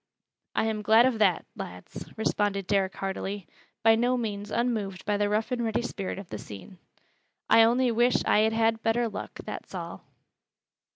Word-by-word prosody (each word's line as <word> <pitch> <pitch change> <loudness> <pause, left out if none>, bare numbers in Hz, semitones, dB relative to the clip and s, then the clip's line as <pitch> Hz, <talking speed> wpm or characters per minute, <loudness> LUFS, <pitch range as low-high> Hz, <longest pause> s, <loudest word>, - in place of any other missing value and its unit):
"I'm 220 -1 0
glad 220 +3 +6
of 250 -4 +1
that, 190 -5 +3
lads," 90 -2 -8
responded 205 -2 0
Derrick 195 -1 +1
heartily, 195 0 -4 0.4
by 225 0 +7
no 245 +3 +2
means 205 -3 -4
unmoved 215 -6 -2
by 210 - +1
the 205 0 +1
rough 215 +4 0
and 245 -1 -1
ready 225 +1 0
spirit 195 -6 -4
of 195 -2 -9
the 105 - -6
scene. 105 - -11 0.7
"I 225 - +8
only 240 +2 +4
wish 240 +2 +2
I - - +4
had 220 +1 +3
had 225 0 +2
better 230 +1 +1
luck, 210 - -7
that's - - -7
all." - - -6
215 Hz, 170 wpm, -27 LUFS, 200-230 Hz, 0.7 s, I